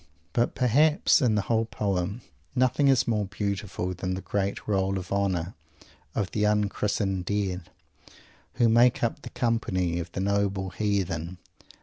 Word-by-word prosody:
But 120 Hz, 0 st, +1 dB
perhaps 145 Hz, +6 st, +4 dB
in 120 Hz, -5 st, +3 dB
the 105 Hz, -, +1 dB
whole 115 Hz, +1 st, +1 dB
poem 100 Hz, 0 st, -2 dB, 0.3 s
nothing 130 Hz, +3 st, +3 dB
is 135 Hz, -2 st, +4 dB
more 105 Hz, -3 st, +1 dB
beautiful 100 Hz, -2 st, -3 dB
than 90 Hz, +1 st, -3 dB
that 95 Hz, -, -7 dB
great 100 Hz, -1 st, -2 dB
roll 95 Hz, -2 st, +1 dB
of 90 Hz, -1 st, -7 dB
honor 95 Hz, -3 st, 0 dB, 0.6 s
of 100 Hz, -4 st, -1 dB
the 105 Hz, -, 0 dB
unchristened 105 Hz, -2 st, 0 dB
Dead, 95 Hz, -4 st, -2 dB, 0.9 s
who 120 Hz, -, +4 dB
make 120 Hz, +2 st, +4 dB
up 120 Hz, +5 st, -1 dB
the -, -, -8 dB
company 95 Hz, -8 st, 0 dB
of 85 Hz, 0 st, -6 dB
the -, -, -3 dB
noble 100 Hz, -1 st, 0 dB
Heathen. 95 Hz, -5 st, -2 dB
100 Hz, 145 wpm, -27 LUFS, 95-115 Hz, 0.9 s, perhaps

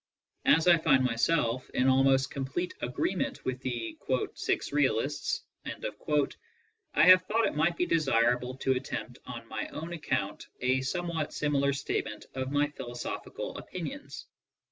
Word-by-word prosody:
As 160 Hz, +2 st, +5 dB
I 170 Hz, -2 st, +7 dB
find 135 Hz, -5 st, +4 dB
myself 125 Hz, 0 st, +1 dB
in 130 Hz, -, +3 dB
almost 135 Hz, 0 st, +4 dB
complete 140 Hz, +6 st, -3 dB
agreement 125 Hz, +9 st, -2 dB
with 130 Hz, 0 st, -2 dB
the 120 Hz, -3 st, -4 dB
''six 130 Hz, -1 st, -1 dB
realists/' 140 Hz, -6 st, +1 dB, 1.5 s
I -, -, +6 dB
have 185 Hz, +2 st, +9 dB
thought 225 Hz, +2 st, +2 dB
it -, -, 0 dB
might 165 Hz, +3 st, +2 dB
be 180 Hz, -, +2 dB
desirable 125 Hz, -6 st, +2 dB
to 135 Hz, -, 0 dB
attempt 130 Hz, +1 st, -4 dB
on -, -, -7 dB
my -, -, -4 dB
own 165 Hz, +2 st, -6 dB
account 160 Hz, -3 st, -2 dB
a 130 Hz, +1 st, +2 dB
some 175 Hz, +7 st, -2 dB
what 160 Hz, -3 st, -2 dB
similar 140 Hz, -2 st, +1 dB
statement 135 Hz, -5 st, -3 dB
of 130 Hz, 0 st, -3 dB
my 145 Hz, +1 st, +2 dB
philosophical 120 Hz, -4 st, -6 dB
opinions. -, -, -7 dB
135 Hz, 140 wpm, -30 LUFS, 130-160 Hz, 1.5 s, have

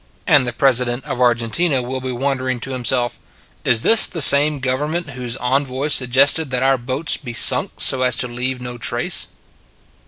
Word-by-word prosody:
And 145 Hz, -7 st, +2 dB
the -, -, -3 dB
President 125 Hz, -1 st, -1 dB
of 125 Hz, -, -6 dB
Argentina 125 Hz, +6 st, 0 dB
will 130 Hz, +1 st, -6 dB
be 130 Hz, 0 st, -5 dB
wondering 130 Hz, 0 st, -3 dB
to 135 Hz, -, -7 dB
himself: 125 Hz, -1 st, -2 dB, 0.2 s
" -, -, -34 dB
Is 115 Hz, -2 st, +2 dB
this 225 Hz, -, +4 dB
the 170 Hz, -, -7 dB
same 145 Hz, +1 st, +5 dB
government 145 Hz, +5 st, -4 dB
whose 125 Hz, -1 st, -6 dB
envoy 130 Hz, +2 st, -2 dB
suggested 140 Hz, +3 st, +3 dB
that 125 Hz, 0 st, -2 dB
our 135 Hz, -1 st, +1 dB
boats 130 Hz, +6 st, -1 dB
be 120 Hz, -5 st, -10 dB
sunk 120 Hz, -, +4 dB
so 130 Hz, -, +2 dB
as 125 Hz, -2 st, +1 dB
to 125 Hz, -, -1 dB
leave 125 Hz, +2 st, -4 dB
no 125 Hz, -1 st, -8 dB
trace 115 Hz, -, -1 dB
130 Hz, 180 wpm, -17 LUFS, 125-140 Hz, 0.2 s, same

